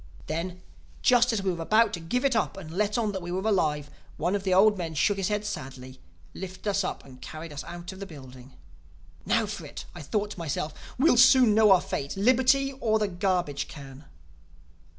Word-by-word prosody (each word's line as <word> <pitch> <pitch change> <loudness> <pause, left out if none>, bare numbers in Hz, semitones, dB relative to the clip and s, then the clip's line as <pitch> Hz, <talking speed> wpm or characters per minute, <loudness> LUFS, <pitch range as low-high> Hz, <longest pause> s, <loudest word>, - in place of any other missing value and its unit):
"Then, 175 +3 -4 0.4
just 245 0 +5
as 215 -4 -1
we 190 -2 0
were 170 - -6
about 215 +5 +3
to 175 - -3
give 210 +11 -2
it 270 -3 +2
up 215 -3 0
and 165 -5 -9
let 210 +5 0
on 220 -3 0
that 190 -2 -5
we 175 0 -6
were 190 +4 -2
alive, 150 -8 0 0.3
one 175 +4 0
of 200 - -1
the 190 - -1
old 205 +3 +5
men 165 -4 -5
shook 150 +8 +2
his 195 -2 -1
head 210 0 -1
sadly, 130 -8 -7 0.3
lifted 185 +2 -8
us 200 -1 +1
up 185 - -4
and 130 -2 -14
carried 155 0 -8
us 145 0 -6
out 175 +1 -8
of 190 - -11
the 195 - -6
building. 130 -5 -12 0.7
"'Now - - +2
for - - -6
it!' - - -8
I - - -9
thought 205 +7 -2
to 185 - -8
myself. 155 -1 -3 0.2
'We'll 265 -1 +4
soon 245 -2 +7
know 215 0 +5
our 185 - +6
fate: 180 -5 -4
liberty 260 +5 +3
or 220 -1 +2
the 210 -1 0
garbage 175 -6 -1
can. 140 0 -11
190 Hz, 210 wpm, -27 LUFS, 155-210 Hz, 0.7 s, soon